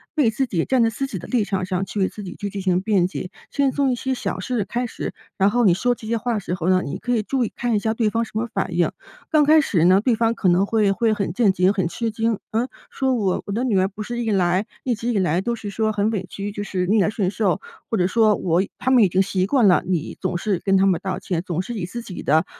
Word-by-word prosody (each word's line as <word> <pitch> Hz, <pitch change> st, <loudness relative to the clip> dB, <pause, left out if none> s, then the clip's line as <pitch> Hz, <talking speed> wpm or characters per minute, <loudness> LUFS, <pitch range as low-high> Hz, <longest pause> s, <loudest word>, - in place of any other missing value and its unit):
为 290 Hz, -8 st, +3 dB
自 250 Hz, +5 st, 0 dB
己 175 Hz, -9 st, -1 dB
站 260 Hz, -3 st, +3 dB
在 225 Hz, -, +3 dB
自 275 Hz, +4 st, -3 dB
己 215 Hz, -, -5 dB
的 170 Hz, -, -8 dB
立 240 Hz, -4 st, +1 dB
场 195 Hz, -2 st, -2 dB
上 185 Hz, 0 st, -1 dB
去 195 Hz, +3 st, -5 dB
为 190 Hz, -, +3 dB
自 210 Hz, -, -9 dB
己 180 Hz, -2 st, -7 dB
去 205 Hz, -, -4 dB
进 200 Hz, -, -4 dB
行 185 Hz, -1 st, +2 dB
辩 195 Hz, -4 st, +2 dB
解。 185 Hz, 0 st, -6 dB, 0.2 s
先 280 Hz, -2 st, +1 dB
从 275 Hz, -1 st, +1 dB
一 -, -, 0 dB
些 260 Hz, +2 st, -2 dB
小 245 Hz, -6 st, -3 dB
事 220 Hz, +1 st, -2 dB
开 245 Hz, +4 st, -2 dB
始， 235 Hz, -, -5 dB, 0.2 s
然 195 Hz, +1 st, +3 dB
后 240 Hz, +2 st, +2 dB
你 185 Hz, -, +6 dB
说 245 Hz, +7 st, +1 dB
这 225 Hz, -, -12 dB
些 230 Hz, +1 st, 0 dB
话 240 Hz, +1 st, -1 dB
的 -, -, 0 dB
时 180 Hz, -, -4 dB
候 180 Hz, 0 st, -1 dB
呢， 185 Hz, -1 st, +3 dB
你 160 Hz, +7 st, -5 dB
可 245 Hz, -, -3 dB
以 220 Hz, -, 0 dB
注 260 Hz, +3 st, 0 dB
意 -, -, -3 dB
看 240 Hz, -2 st, 0 dB
一 -, -, +2 dB
下 220 Hz, +2 st, -1 dB
对 220 Hz, -2 st, +1 dB
方 230 Hz, +1 st, 0 dB
什 230 Hz, -, -9 dB
么 225 Hz, +2 st, -1 dB
反 190 Hz, -3 st, -2 dB
应。 175 Hz, -, +2 dB, 0.4 s
刚 305 Hz, -1 st, +5 dB
开 310 Hz, +1 st, +6 dB
始 180 Hz, -, +1 dB
呢， 185 Hz, +2 st, +6 dB
对 245 Hz, +3 st, +2 dB
方 230 Hz, +1 st, +1 dB
可 195 Hz, -, 0 dB
能 180 Hz, +3 st, +3 dB
会 215 Hz, -3 st, +2 dB
会 225 Hz, +3 st, +1 dB
很 200 Hz, -5 st, -2 dB
震 210 Hz, 0 st, +3 dB
惊， 185 Hz, +1 st, +2 dB
很 190 Hz, -4 st, 0 dB
吃 230 Hz, +5 st, -3 dB
惊， 225 Hz, -1 st, 0 dB
呃， 230 Hz, +3 st, 0 dB, 0.2 s
说： 265 Hz, -1 st, 0 dB
“我 195 Hz, -5 st, 0 dB
我 -, -, -4 dB
的 225 Hz, +5 st, -1 dB
女 220 Hz, -7 st, +2 dB
儿 190 Hz, -, +2 dB
不 210 Hz, +2 st, -7 dB
是 240 Hz, +2 st, -4 dB
一 225 Hz, -, -1 dB
来 185 Hz, 0 st, +2 dB, 0.2 s
一 250 Hz, -, 0 dB
直 230 Hz, +2 st, -5 dB
以 -, -, 0 dB
来 175 Hz, -2 st, +1 dB
都 235 Hz, +4 st, -1 dB
是 215 Hz, -2 st, -7 dB
说 215 Hz, +2 st, 0 dB
很 205 Hz, +1 st, +1 dB
委 205 Hz, -4 st, -2 dB
屈， 200 Hz, +1 st, -5 dB
就 205 Hz, 0 st, -5 dB
是 185 Hz, -3 st, -2 dB
逆 215 Hz, +1 st, +3 dB
来 195 Hz, -, +2 dB
顺 200 Hz, -3 st, -1 dB
受？ 205 Hz, -1 st, 0 dB, 0.3 s
“或 225 Hz, -, 0 dB
者 180 Hz, -2 st, +2 dB
说 215 Hz, +1 st, +3 dB
我 175 Hz, -1 st, +1 dB, 0.2 s
他 260 Hz, -, 0 dB
们 250 Hz, -4 st, +6 dB
已 195 Hz, -, +4 dB
经 185 Hz, +2 st, +2 dB
习 190 Hz, -1 st, 0 dB
惯 245 Hz, -2 st, +4 dB
了， 180 Hz, -, +4 dB
你 175 Hz, -3 st, -2 dB
总 185 Hz, -2 st, -1 dB
是 195 Hz, -1 st, -1 dB
跟 195 Hz, -1 st, +3 dB
他 190 Hz, -, +4 dB
们 185 Hz, -4 st, +2 dB
道 190 Hz, -2 st, -3 dB
歉， 175 Hz, -4 st, -2 dB
总 175 Hz, 0 st, -1 dB
是 220 Hz, +6 st, -6 dB
以 195 Hz, -5 st, -3 dB
自 235 Hz, +7 st, -6 dB
己 195 Hz, -6 st, -8 dB
的， 155 Hz, +2 st, +3 dB
205 Hz, 320 characters per minute, -22 LUFS, 185-230 Hz, 0.4 s, 你